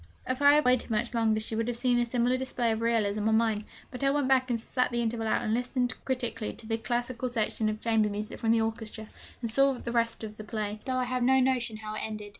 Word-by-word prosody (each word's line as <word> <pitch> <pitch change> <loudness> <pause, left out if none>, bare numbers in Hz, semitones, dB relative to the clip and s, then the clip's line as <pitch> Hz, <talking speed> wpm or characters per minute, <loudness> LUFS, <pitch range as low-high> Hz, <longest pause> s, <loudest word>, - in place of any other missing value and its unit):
If 255 +2 -2
I 285 0 +8
had 300 -1 +4
waited 250 -1 +3
much 230 +2 0
longer 225 -2 +2
she 220 +1 -4
would 225 +1 -1
have 240 -1 -2
seen 245 0 +2
a 240 - +1
similar 245 +1 +1
display 255 -2 -1
of 220 0 -2
realism 215 -2 +1
on 220 - +4
mine. 220 -2 +1 0.3
But 250 +1 -5
I 275 - +4
went 285 -1 +1
back 260 -1 +3
and 235 -1 0
sat 250 +3 0
the 240 - -2
interval 225 -1 -1
out, - - +1
and 215 - 0
listened 245 +1 0
critically 240 -4 -2
to 225 - -12
the 225 0 -2
classical 240 +2 -2
selection 220 -2 -1
of 215 0 -3
chamber 220 -2 +2
music 210 +1 -5
from 225 - -1
the 230 -1 +4
orchestra, 220 0 -4 0.4
and 230 - -1
saw 275 +3 +4
the 245 -1 -5
rest 230 -1 0
of 215 0 -7
the 215 - -7
play, 215 -1 -4
though 260 -1 -1
I 255 - +1
have 250 0 -2
no 265 +2 +4
notion 250 -4 +1
how 215 0 -6
it 215 - -3
ended. 215 -1 -5
230 Hz, 260 wpm, -29 LUFS, 220-250 Hz, 0.4 s, I